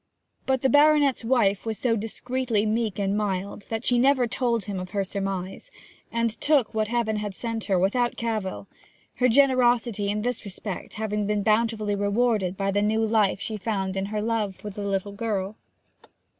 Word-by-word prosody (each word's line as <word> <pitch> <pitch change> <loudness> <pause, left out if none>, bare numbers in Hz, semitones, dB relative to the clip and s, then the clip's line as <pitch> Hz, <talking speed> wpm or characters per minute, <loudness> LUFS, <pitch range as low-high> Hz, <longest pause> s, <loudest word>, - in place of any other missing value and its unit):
But 265 -1 +1
the - - +5
baronet's 290 -2 +4
wife 225 -5 +2
was 225 -2 -3
so 235 -3 +1
discreetly 225 0 -1
meek 220 -1 -1
and 200 -1 0
mild 200 -1 -3
that 225 +1 -3
she 245 -1 +4
never 260 0 +4
told 235 -2 0
him 195 0 -4
of 185 0 -6
her 200 - +2
surmise, 195 - -4 0.4
and 230 -1 -1
took 285 -6 +2
what 215 -1 0
Heaven 225 -2 0
had 205 -2 -4
sent 230 0 -3
her 195 -2 +2
without 240 +7 +1
cavil, 215 -4 -3 0.5
her 250 - +4
generosity 240 -5 +3
in 210 +1 -1
this 245 -1 -2
respect 200 -1 -7
having 210 -1 -2
been 210 -1 0
bountifully 215 -1 +1
rewarded 205 -2 +1
by 195 0 0
the 205 +1 +1
new 220 +2 +2
life 215 -3 +2
she 215 +1 -4
found 195 -2 -2
in 195 0 -2
her 210 0 -2
love 220 -4 -1
for 210 - -8
the 205 - -7
little 200 0 -2
girl. 200 -2 -3
215 Hz, 180 wpm, -25 LUFS, 200-235 Hz, 0.5 s, the